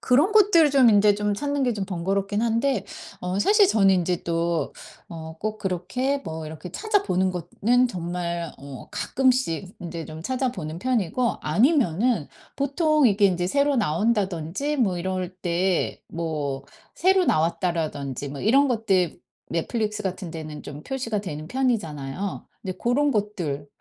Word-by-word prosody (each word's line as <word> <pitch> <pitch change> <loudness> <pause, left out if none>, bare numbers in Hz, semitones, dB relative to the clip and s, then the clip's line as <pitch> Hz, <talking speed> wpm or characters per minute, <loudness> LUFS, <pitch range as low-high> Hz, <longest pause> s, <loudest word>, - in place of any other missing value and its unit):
그런 285 +10 +3
것들 360 -8 +6
좀 265 -4 +6
인제 205 -1 +5
좀 210 0 0
찾는 285 +3 -1
게 245 - +2
좀 200 -2 -2
번거롭긴 195 +3 -1
한데 230 -2 +1 0.4
어 180 +2 -2
사실 410 - +5
저는 195 - +4
인제 180 -1 0
또 170 0 -1 0.4
어 160 -1 -8
꼭 215 0 -3
그렇게 215 +9 -1
뭐 160 -1 -5
이렇게 160 +3 -8
찾아보는 380 - +1
것 175 -1 -5
는 245 +3 +4
정말 170 -3 -3
어 140 -2 -9
가끔씩 245 -9 0
인제 170 -2 -5
좀 160 0 -9
찾아보는 245 - -2
편이고 240 +1 0
아니면은 235 - +2 0.3
보통 300 0 +2
이게 200 0 +2
인제 180 -1 0
새로 280 +4 +2
나온다든지 205 - 0
뭐 200 -9 +1
이럴 185 0 -3
때 180 +1 0
뭐 150 -5 -3 0.3
새로 375 +1 +3
나왔다라든지 155 - -1
뭐 140 0 -7
이런 275 +6 +4
것들 195 -9 +1 0.3
넷플릭스 210 +5 -2
같은 185 -2 -4
데는 155 -2 -7
좀 145 +1 -9
표시가 230 -6 -2
되는 155 -4 -6
편이잖아요. 195 - -2 0.2
네 190 - -3
고런 280 +5 +2
것들 180 - -2
195 Hz, 290 characters per minute, -24 LUFS, 170-250 Hz, 0.4 s, 것들